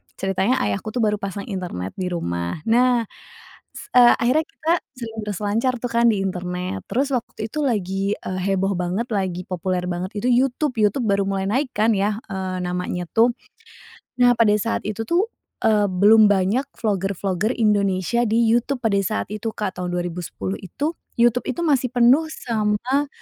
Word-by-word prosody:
ceritanya 195 +7 0
ayahku 215 +2 -2
tuh 240 - +1
baru 210 -1 +2
pasang 200 0 -5
internet 175 - -4
di 185 - -1
rumah. 85 - -3
Nah 245 0 +4 0.7
s - - -10
eee, 245 -1 +8
akhirnya, 255 +7 +2
kita 325 +2 -1 0.2
sering 225 -2 -6
berselancar 210 +5 -1
tuh 245 - -3
kan 235 0 +3
di 210 -3 +1
internet. 180 - -3
Terus 270 +4 0
waktu 230 -3 -3
itu 305 - -3
lagi, 195 -7 -1
eee, 185 0 -5
heboh 195 0 +1
banget 180 +6 -2
lagi 185 -3 -2
populer 180 0 -2
banget 180 +1 -3
itu 205 - -1
YouTube. 260 +3 +1
YouTube 210 +4 +2
baru 200 -1 +2
mulai 195 -1 -1
naikkan 230 -1 +1
ya, 205 +1 0
eee, 190 -2 -4
namanya 180 0 -3
tuh. 230 +2 +4 0.9
Nah, 245 -1 +5
pada 225 -3 +3
saat 225 +2 -1
itu 215 +1 -3
tuh, 350 - +1 0.3
eee, 215 -2 +3
belum 210 +4 +6
banyak 200 +7 +1 0.2
vlogger-vlogger 195 0 -1
Indonesia 205 0 +1
di 230 0 +2
YouTube 240 +3 +1
pada 220 -4 +2
saat 215 +3 -2
itu, 215 +2 -4
Kak, 205 -3 -4
tahun 180 -1 -3
2010 175 - -4
itu. 295 - -4 0.2
YouTube 240 0 +2
itu 340 - -2
masih 270 -5 +2
penuh 250 +6 +4
sama 235 +2 -1
210 Hz, 165 wpm, -22 LUFS, 185-240 Hz, 0.9 s, eee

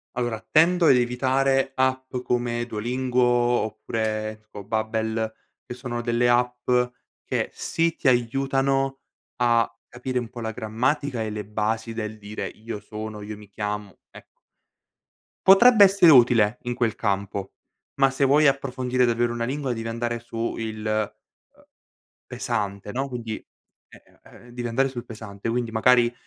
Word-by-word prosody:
Allora, 120 -3 -2
tendo 170 +2 +5
ad 135 - +7
evitare 130 +2 +1
app 130 0 0
come 120 -1 -1
Duolingo 125 +3 -1
oppure 110 -2 0
tipo 105 -2 -11
Babbel, 110 +1 -1 0.3
che 125 - -7
sono 120 -1 -4
delle 120 +1 +1
app 125 0 +1 0.6
che - - -2
sì, 165 0 -1
ti - - -2
aiutano 135 +2 +1 0.3
a 120 -2 +2 0.2
capire 125 +1 -4
un 120 -2 -2
po' 120 - -9
la 110 -1 -3
grammatica 120 +4 -1
e 110 - -2
le 105 -1 -5
basi 110 +2 -2
del 110 -1 -5
dire: 105 0 -6
"Io 110 -1 -7
sono, 110 0 -7
io 105 +1 -7
mi 105 -1 -14
chiamo", 105 -1 -5
ecco. - - -17 1.1
Potrebbe 210 +3 +8
essere 190 -3 +6
utile 120 -4 +5
in 120 - -2
quel 115 -3 0
campo, 100 -2 -2 0.5
ma 135 0 +5
se 135 +1 +1
vuoi 145 +3 +5
approfondire 130 -2 +1
davvero 120 0 +1
una 115 0 -2
lingua 135 0 -2
devi 115 -1 -5
andare 120 +1 -2
su 115 0 -4
il, 110 -1 -4
uhm, 110 -1 -5 0.6
pesante, 100 0 -3
no, 135 +4 -2
quindi 115 -4 -5 0.5
eh, - - -17 0.2
uhm, 120 - -16
devi 120 0 -4
andare 135 +4 +1
sul 125 -2 -7
pesante. 110 -3 -7
Quindi 120 0 -1
magari 120 +1 +4
120 Hz, 145 wpm, -24 LUFS, 110-130 Hz, 1.1 s, Potrebbe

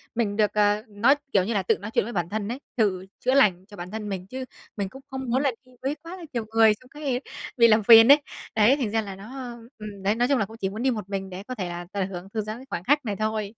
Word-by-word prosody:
Mình 215 -4 0
được, 210 -1 +2
ờ, 210 0 +2
nói 220 +7 +3 0.2
kiểu 195 - +4
như 225 +5 -2
là, 195 - 0
tự - - +2
nói 205 +2 -7
chuyện - - +3
với 240 - -6
bản 175 -2 -1
thân 210 -1 -3
ấy, 245 +5 -4 0.2
tự 190 -5 +1
chữa 255 - +1
lành 190 -9 +4
cho 205 -1 -14
bản 175 +1 -7
thân 215 -1 -5
mình, 185 -1 -5
chứ 260 +4 -6 0.3
mình 200 -2 -2
cũng 265 +4 -12
không 265 -1 -5
muốn 260 +3 +2
là 275 -2 +2
đi 255 - -21
với 275 +3 -1
quá 335 +3 -10
là 350 - -10
nhiều 235 -3 -2
người 225 -1 +6
trong 210 - -15
xong 300 - -10
cái 255 -3 0 0.4
bị 235 -1 +7
làm 215 -1 +4
phiền 225 +1 +9
ấy. 290 +1 +7 0.3
Đấy, 220 +5 +5
thành 240 -7 -2
ra 225 0 +1
là 195 -2 -7
nó 245 +5 -8 0.3
ừm, 210 -3 -9
đấy 205 +3 +2
nói 245 +1 +2
chung 275 0 +3
là 205 - +1
cũng 225 +3 -13
chỉ 195 -4 -2
muốn 215 +4 -5
đi 265 - +3
một 210 -5 -5
mình 195 -1 -3
để 185 +1 -7
có 255 +4 -6
thể, 185 -6 -3
à, 175 0 -6
tận 195 -2 -1
hưởng 185 0 -8
thư 220 - 0
giãn 215 +2 -5
cái 260 - -12
khoảng 175 - -4
khắc 290 +5 +2
này 210 -2 -2
thôi. 215 0 -1
215 Hz, 305 wpm, -25 LUFS, 200-245 Hz, 0.4 s, phiền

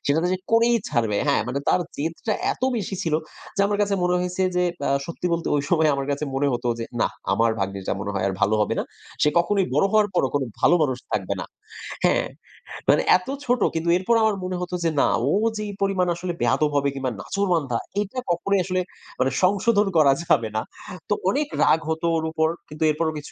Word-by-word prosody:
সে 140 - +3 0.4
করেই 235 +1 +5
ছাড়বে। 115 -7 0
হ্যাঁ 140 - +3
মানে 140 - -1
তার 185 - +3 0.2
জেদটা 165 +8 -2 0.2
এত - - -14
বেশি 195 -2 -3
ছিল 160 -2 0 0.4
যে - - +1
আমার 205 0 -1
কাছে 200 -1 +1
মনে 180 0 +2
হইছে 180 +1 -2
যে 180 - +3 0.2
আ - - +1 0.2
সত্যি 170 +1 -4
বলতে 170 0 -1
ওই 140 - 0
সময় 160 -3 +4
আমার 140 0 -3
কাছে 145 +2 -1
মনে 140 +1 +1
হত 120 0 -3
যে, 115 - -3 0.2
"না - - +3 0.2
আমার 115 0 +3
ভাগ্নিটা 95 0 -2
মনে 100 +1 -3
হয় 95 - -1
আর - - -2
ভাল - - +3
হবে 105 - +1
না। - - -1 0.4
সে 150 - +5
কখনই 195 +3 +2
বড় - - +3
হওয়ার 215 -1 +4
পরও 135 -7 +2
কোন 140 - +2 0.2
ভালো 175 - +5
মানুষ 130 -4 0
থাকবে 100 -1 -1
না" - - -4 0.6
হ্যাঁ, - - +3 0.6
মানে - - +5 0.2
এত 180 - -14 0.2
ছোট 245 -2 +1
কিন্তু 165 +1 -1
এরপর 210 +6 +1
আমার 215 -2 +3
মনে 185 0 -3
হত 180 - -5
যে 165 - +2
না - - +4 0.2
ও - - +3 0.3
যে - - -3
এই - - -6
পরিমাণ 190 -2 +1
আসলে 175 0 -4
বেয়াদব 150 -1 +2
হবে 140 0 +2
কিংবা 130 -2 -2
নাছোড়বান্দা 165 - 0 0.2
এটা 210 +6 -4
কখনোই 195 +3 +1
আসলে 185 -1 0 0.4
মানে 130 0 +2
সংশোধন 205 +2 +3
করা 140 -3 +6
যাবে 115 -9 +2
না 110 - +1 0.5
তো - - +3 0.2
অনেক 290 +7 0 0.2
রাগ 160 - +4
হতো 160 +1 -2
ওর 160 - -2
উপর। 160 0 +1 0.2
কিন্তু 150 +1 -4
এরপরও 160 +1 -1
কিছু 145 - -9
165 Hz, 210 wpm, -23 LUFS, 140-195 Hz, 0.6 s, করা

